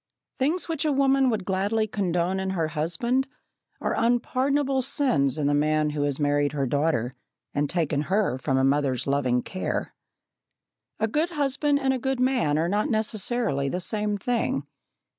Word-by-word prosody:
Things 310 +7 0
which 325 -4 -2
a 305 - +1
woman 270 -1 +3
would 215 -5 -2
gladly 200 +4 0
condone 185 -3 -1
in 190 0 -2
her 160 -2 0
husband 205 - 0 0.5
are - - -1
unpardonable 265 +3 +1
sins 205 - +2
in 150 - -1
the 145 - +2
man 150 +1 +1
who 150 -1 -3
has 145 -1 0
married 145 0 +1
her 140 -2 0
daughter, 140 -3 0 0.4
and 145 0 0
taken 155 -5 0
her 195 -10 +1
from 130 +1 0
a 130 - +2
mother's 135 -2 +1
loving 130 -3 +1
care. 185 - -3 1.1
A 220 - +1
good 305 +9 0
husband 290 -2 +1
and 265 -1 +1
a 260 - -2
good 265 +1 -1
man 250 - +2
are 165 +2 +1
not 205 +4 0
necessarily 215 - 0
the 180 - -2
same 210 +2 -1
thing. 225 - -1
190 Hz, 165 wpm, -25 LUFS, -, 1.1 s, woman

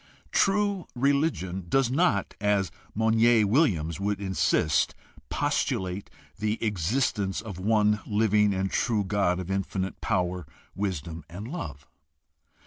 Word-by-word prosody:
True 200 -2 +2
religion 130 - 0
does 135 +1 +2
not, 135 - +1
as 100 -5 +1 0.2
Monier 110 +1 +4
Williams 95 - +2
would 100 0 -1
insist, 95 -5 +1 0.3
postulate 95 +1 -1 0.3
the 110 +1 0
existence 105 0 0
of 105 -4 -7
one 105 +1 +3
living 105 -1 +3
and 95 0 -1
true 110 -4 +1
God 95 -2 +1
of 95 +1 -5
infinite 95 0 -2
power, 90 -3 -1 0.3
wisdom, 85 -5 -4
and 100 +6 -7
love. 75 - -6
100 Hz, 115 wpm, -27 LUFS, 95-115 Hz, 0.3 s, Monier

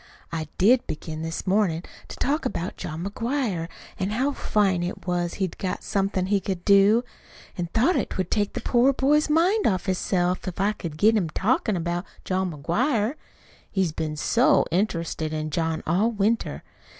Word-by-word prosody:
I 160 -2 -3
did 235 +6 +4
begin 155 0 -5
this 165 0 -4
mornin' 185 -4 +1 0.2
to - - -8
talk 295 +5 0
about 185 -9 -3
John 160 +2 -5
McGuire 210 - -2 0.3
an' 190 +1 0
how 255 +7 0
fine 200 -8 +1
it 175 +1 -4
was 175 -1 -1
he'd 190 -3 -3
got 185 - -3
somethin' 195 -2 0
he 200 +1 +2
could 185 -2 -4
do. 205 +3 +5 0.5
I 175 -1 -3
thought't 265 +11 +1
would 185 -2 -2
take 205 -1 +1
the - - -4
poor 250 +3 +3
boy's 295 +4 +2
mind 360 +8 +3
off 185 -4 0
hisself, 180 -1 0
if 180 - -5
I 200 +2 +3
could 170 -7 -7
get 220 +6 +4
him 185 -7 +1
talkin' 215 +3 +1
about 175 +2 -2 0.2
John 185 -1 0
McGuire 210 - 0 0.6
he's 190 -4 0
been 155 -1 -3
SO 230 - +3
interested 165 -4 -1
in 155 0 -3
John 160 +1 -1
all 190 +8 +2
winter! 220 +1 0
190 Hz, 170 wpm, -25 LUFS, 170-225 Hz, 0.6 s, do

